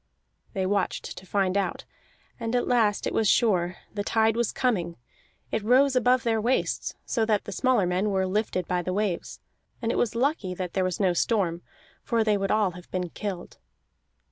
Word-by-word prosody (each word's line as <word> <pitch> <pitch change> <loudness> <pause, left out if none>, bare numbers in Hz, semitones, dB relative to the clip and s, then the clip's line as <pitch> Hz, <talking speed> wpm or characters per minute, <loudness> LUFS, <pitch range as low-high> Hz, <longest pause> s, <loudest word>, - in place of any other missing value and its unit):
They 190 -3 -1
watched 195 0 -1
to 190 - -11
find 195 -1 +1
out, 195 -3 -1 0.5
and 230 +1 -2
at 245 - +1
last 225 -5 +2
it - - -2
was 220 -2 +2
sure: 180 -6 +2 0.2
the 205 -1 -2
tide 220 +1 +2
was 235 -1 0
coming. 180 -10 0 0.6
It 220 - -1
rose 260 +4 +4
above 250 0 +3
their 225 -2 +1
waists, 245 +4 0
so 230 - 0
that 210 -2 +2
the - - -7
smaller 255 -7 +2
men 180 +4 0
were 190 -1 +1
lifted 185 -2 -1
by 180 -1 0
the 185 +1 -3
waves; 200 -3 -2 0.4
and 230 -1 -1
it - - 0
was 235 -1 0
lucky 235 - 0
that 180 -1 -4
there 190 - +1
was 185 -1 -2
no 190 -3 +3
storm, 175 -3 0 0.4
for 230 -1 +1
they 215 -1 +2
would 195 -1 -1
all 210 -3 +2
have 180 0 -13
been 180 -1 -2
killed. 195 -4 -6
205 Hz, 195 wpm, -26 LUFS, 185-230 Hz, 0.6 s, rose